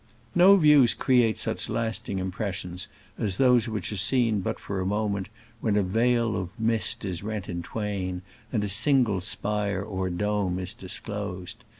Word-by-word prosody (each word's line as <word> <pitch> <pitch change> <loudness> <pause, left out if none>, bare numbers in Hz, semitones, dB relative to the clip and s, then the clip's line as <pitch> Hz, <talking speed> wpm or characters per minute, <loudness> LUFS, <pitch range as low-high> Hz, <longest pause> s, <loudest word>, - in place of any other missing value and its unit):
No 185 +3 +7
views 150 -8 +6
create 120 -4 +3
such - - -2
lasting 110 -3 -2
impres 95 +2 -2
sions 90 +1 -5 0.3
as 100 -5 -1
those 125 -3 +4
which 105 -4 -3
are - - -3
seen 115 +1 +2
but - - -3
for 100 -1 -4
a - - -1
moment 100 -1 -1 0.3
when 110 -2 0
a 105 - +3
veil 115 +3 +2
of 90 -2 -3
mist 110 -2 0
is 90 -3 -3
rent 105 -2 -4
in 85 0 -4
twain 95 -3 -3 0.3
and 110 -3 0
a - - -1
single 110 -1 +2
spire 100 0 -2
or 95 -3 -3
dome 95 0 -1
is 90 -1 -3
dis 95 0 -6
closed. 100 0 -6
105 Hz, 175 wpm, -26 LUFS, 95-115 Hz, 0.3 s, No